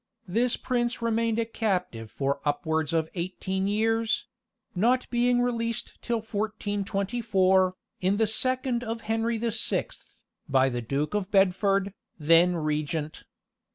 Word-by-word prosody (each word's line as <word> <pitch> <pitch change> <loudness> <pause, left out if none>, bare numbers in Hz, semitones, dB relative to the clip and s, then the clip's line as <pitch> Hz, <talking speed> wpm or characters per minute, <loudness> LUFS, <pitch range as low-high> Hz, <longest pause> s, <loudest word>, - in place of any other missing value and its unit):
This 235 +7 +1
prince 240 -1 -1
remained 230 -1 +1
a 230 - +1
captive 180 - -2
for 140 +4 -1
upwards 160 +1 0
of 160 -1 +1
eighteen 190 +2 -2
years; 225 +2 +1 0.5
not 240 +7 +2
being 245 0 +3
released 230 -1 -2
till 235 -2 -1
1424, 200 -2 0 0.2
in 190 +2 +1
the 225 - +3
second 255 +2 0
of 230 0 -4
Henry 225 +1 0
the 230 +1 -1
Sixth, 220 - -2 0.4
by 135 -1 +4
the 120 -1 -3
Duke 140 - -2
of 205 -2 -1
Bedford, 195 0 +2 0.2
then 165 +3 +5
regent. 155 0 -2
205 Hz, 125 wpm, -27 LUFS, 175-230 Hz, 0.5 s, then